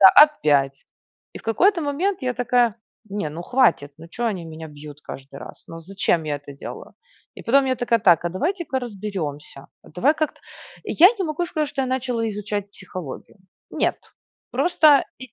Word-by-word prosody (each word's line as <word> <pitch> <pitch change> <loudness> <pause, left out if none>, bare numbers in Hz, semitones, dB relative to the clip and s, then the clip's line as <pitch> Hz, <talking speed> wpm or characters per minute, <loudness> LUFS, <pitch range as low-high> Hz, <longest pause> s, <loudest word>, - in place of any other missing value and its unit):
да. 190 - +11
Опять. 145 - +2 0.5
И - - -6
в - - -15
какой-то 345 - +3
момент 320 +6 -1
я 255 -1 0
такая: 245 -2 +2 0.3
"Не, 200 -5 -2
ну, 165 +3 -7
хватит. 235 - +2
Ну, 165 - -11
чё 240 +8 -4
они 190 -7 -2
меня 160 0 -8
бьют 150 0 -11
каждый 135 +1 -9
раз? - - -11
Ну, 165 0 -9
зачем 175 -2 0
я 150 -1 -2
это 145 0 -11
делаю?" 140 - -9 0.4
И - - -10
потом 275 +3 +4
я 260 - +1
такая: 240 -1 +1
"Так, 175 -5 +4
а - - +1
давайте-ка 320 - -2
разберёмся. 190 - -6 0.2
А - - -17
давай 260 - +2
как-то" 310 -1 -2 0.4
Я 360 +4 +6
не 380 - 0
могу 315 +2 -2
сказать, 305 -2 -2
что 280 - -3
я - - -1
начала 250 -3 -1
изучать 205 -1 -4
психологию. 185 -7 -9 0.3
Нет. - - 0 0.5
Просто 310 -5 +4
и 260 -1 -11
215 Hz, 180 wpm, -23 LUFS, 165-275 Hz, 0.5 s, да